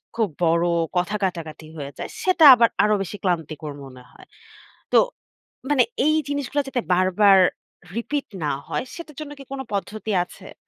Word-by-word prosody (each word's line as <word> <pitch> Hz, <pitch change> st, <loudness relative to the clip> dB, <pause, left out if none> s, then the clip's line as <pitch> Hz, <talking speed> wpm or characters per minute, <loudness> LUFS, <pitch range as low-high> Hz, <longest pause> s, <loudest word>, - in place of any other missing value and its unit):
খুব 220 Hz, -4 st, +1 dB, 0.2 s
বড় 170 Hz, +1 st, +2 dB, 0.3 s
কথা 180 Hz, +4 st, 0 dB
কাটাকাটি 160 Hz, -4 st, -4 dB
হয়ে 140 Hz, -1 st, -6 dB
যায়। -, -, -5 dB
সেটা 365 Hz, -4 st, +4 dB
আবার 230 Hz, -1 st, +4 dB
আরো 210 Hz, 0 st, +3 dB
বেশি 205 Hz, +3 st, -7 dB
ক্লান্তিকর 160 Hz, -4 st, -2 dB
মনে 130 Hz, -1 st, -13 dB
হয়। -, -, -17 dB, 0.7 s
তো -, -, +8 dB, 0.7 s
মানে 285 Hz, -3 st, +4 dB, 0.2 s
এই 310 Hz, 0 st, +4 dB
জিনিসগুলো 285 Hz, 0 st, -1 dB
যাতে 255 Hz, -3 st, -1 dB
বারবার 190 Hz, +2 st, +5 dB, 0.6 s
রিপিট 285 Hz, +4 st, -2 dB, 0.2 s
না 150 Hz, -, 0 dB, 0.2 s
হয় -, -, -2 dB
সেটার 325 Hz, -4 st, -10 dB
জন্য 290 Hz, -1 st, -7 dB
কি -, -, -9 dB
কোন 270 Hz, -, -5 dB
পদ্ধতি 210 Hz, +3 st, -3 dB
আছে? -, -, -14 dB
205 Hz, 155 wpm, -23 LUFS, 170-275 Hz, 0.7 s, তো